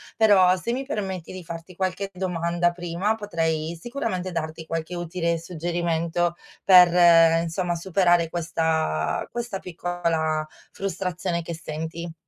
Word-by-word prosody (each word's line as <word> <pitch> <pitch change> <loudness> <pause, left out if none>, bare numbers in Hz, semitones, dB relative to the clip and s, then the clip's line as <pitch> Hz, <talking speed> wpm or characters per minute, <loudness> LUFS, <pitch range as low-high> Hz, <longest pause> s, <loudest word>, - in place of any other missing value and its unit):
però 190 -5 +5
se 230 +6 -3
mi 265 +2 -2
permetti 190 - -4
di 185 -1 -8
farti 165 +2 -9
qualche 190 +2 -2
domanda 175 -1 0
prima 175 +5 -1
potrei 165 -6 -2
sicuramente 230 -8 -3
darti 160 -1 -5
qualche 165 +1 -3
utile 170 -1 -1
suggerimento 170 0 -1 0.3
per, 175 -3 +7
insomma, 175 +1 -2
superare 175 -1 +2
questa 160 - -1
questa 240 -4 -4
piccola 165 -3 -2 0.3
frustrazione 180 -2 -3
che 165 0 -6
senti. 160 +1 -6
175 Hz, 115 wpm, -24 LUFS, 165-185 Hz, 0.3 s, per